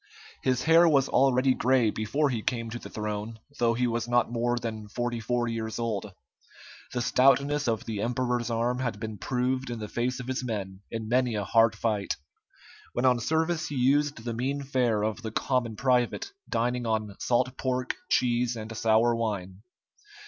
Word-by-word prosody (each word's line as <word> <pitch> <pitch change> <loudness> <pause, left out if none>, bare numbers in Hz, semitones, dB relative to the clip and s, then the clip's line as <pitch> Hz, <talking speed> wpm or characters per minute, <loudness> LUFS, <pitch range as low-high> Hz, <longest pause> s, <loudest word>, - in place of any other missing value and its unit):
His 130 -1 +1
hair 165 +1 +6
was 140 -3 +3
already 130 0 +3
gray 125 -3 +3
before 135 +8 0
he 115 -3 -2
came 115 -1 -2
to 120 - -5
the - - -9
throne, 105 +1 -4 0.2
though 115 -1 +3
he 125 +1 +1
was 120 -1 -1
not 120 -1 +2
more 120 +1 0
than 110 -3 -5
forty 120 +2 -2
four 120 +2 0
years 110 -1 -3
old. 110 -3 -2 0.8
The 120 - -1
stoutness 135 +3 +3
of 115 -2 0
the 105 -3 -3
emperor's 120 0 -1
arm 120 +2 0
had 115 -5 -2
been 110 -2 -6
proved 130 +1 -1
in 120 - -4
the 105 -1 -5
face 125 +4 -2
of 125 - -6
his 130 0 -2
men 100 -5 -4
in 115 -1 -4
many 125 0 +2
a 105 - -1
hard 115 +1 +4
fight. 105 -2 -1 0.8
When 120 - 0
on 125 -2 +4
service 160 +4 0
he 145 - -5
used 145 +3 +2
the 120 - -2
mean 135 +5 -2
fare 125 -6 +1
of 110 +2 -2
the 115 - -4
common 115 0 -1
private, 125 - +1 0.2
dining 120 +1 0
on 110 -2 -1
salt 125 +1 +1
pork, 130 -1 -1
cheese, 120 0 +2
and 110 0 -7
sour 115 +2 +3
wine. 100 -4 -3
120 Hz, 180 wpm, -28 LUFS, 110-130 Hz, 0.8 s, hair